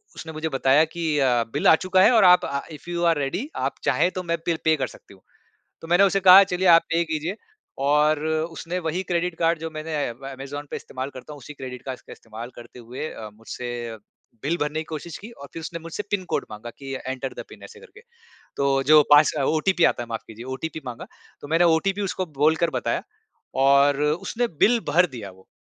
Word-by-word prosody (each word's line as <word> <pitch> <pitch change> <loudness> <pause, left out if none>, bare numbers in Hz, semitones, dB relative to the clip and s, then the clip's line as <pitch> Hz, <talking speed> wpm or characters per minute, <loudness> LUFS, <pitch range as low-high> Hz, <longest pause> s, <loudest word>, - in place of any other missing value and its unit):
उसने 160 -1 -8
मुझे 160 +1 -3
बताया 135 +2 +3
कि 170 +2 -7 0.2
अ, 125 -3 +3
बिल 145 - +1
आ - - +9
चुका 185 +3 +2
है 220 - +6
और 220 -4 +5
आप 180 0 +6
अ, 140 0 -3
इफ 155 +3 -12
यू 175 0 -2
आर 165 -2 +3
रेडी 145 - -3
आप - - -2
चाहे 180 - +2
तो 185 - -5
मैं 170 -1 -1
बिल 165 -2 +1
पे 160 0 +4
कर 130 -3 -1
सकती 100 - -16
हूँ। 95 - -24 0.6
तो 165 - -10
मैंने 175 +3 +5
उसे 195 0 +2
कहा 190 +1 +9
चलिए 185 0 0
आप 165 - +6
पे 165 +1 +3
कीजिए 160 +5 -3 0.5
और 150 +1 +3
उसने 165 +2 -2
वही 165 +2 -2
क्रेडिट 175 0 0
कार्ड 165 -1 +2
जो 165 0 -5
मैंने 155 0 -6
अमेज़न 135 +3 -8
पे - - -3
इस्तेमाल 130 +2 -6
करता 135 +4 -11
हूँ - - -12
उसी 150 +4 -10
क्रेडिट 130 -2 -8
कार्ड 130 -2 -6
का - - -13
इस्तेमाल 115 +2 -9
करते 120 +1 -12
हुए 125 +6 -6
अ, 110 - -8
मुझसे 120 +1 -6 0.5
बिल 165 +4 0
भरने 150 +1 -1
की 160 - -6
कोशिश 160 +2 -7
की 215 - -11
और 140 - -9
फिर 165 - -5
उसने 170 +1 -6
मुझसे 165 +5 -5
पिन 195 -3 -1
कोड - - 0
माँगा 110 +2 -8
कि 135 -1 -6
एंटर 130 0 -4
द - - -7
पिन - - -14
ऐसे - - -13
करके। 420 -2 -16 0.6
तो 135 -1 +2
जो 155 -1 +9
पास 145 +1 +7
ओटीपी 175 +3 +1
आता 120 - +1
है 120 - -13
माफ़ 115 - -4
कीजिए 115 +2 -10
ओटीपी 160 +2 -6
माँगा। 120 -1 -7 0.3
तो 145 - -8
मैंने 165 +3 +3
ओटीपी 195 +5 -1
उसको 190 -1 -2 0.2
बोलकर 160 +3 +3
बताया - - -2 0.6
और 140 +1 +4
उसने 175 +10 -1 0.2
बिल 235 +2 +5
भर 175 +5 +5
दिया 105 -4 -7
वो। 95 0 -21
155 Hz, 220 wpm, -24 LUFS, 135-170 Hz, 0.6 s, आ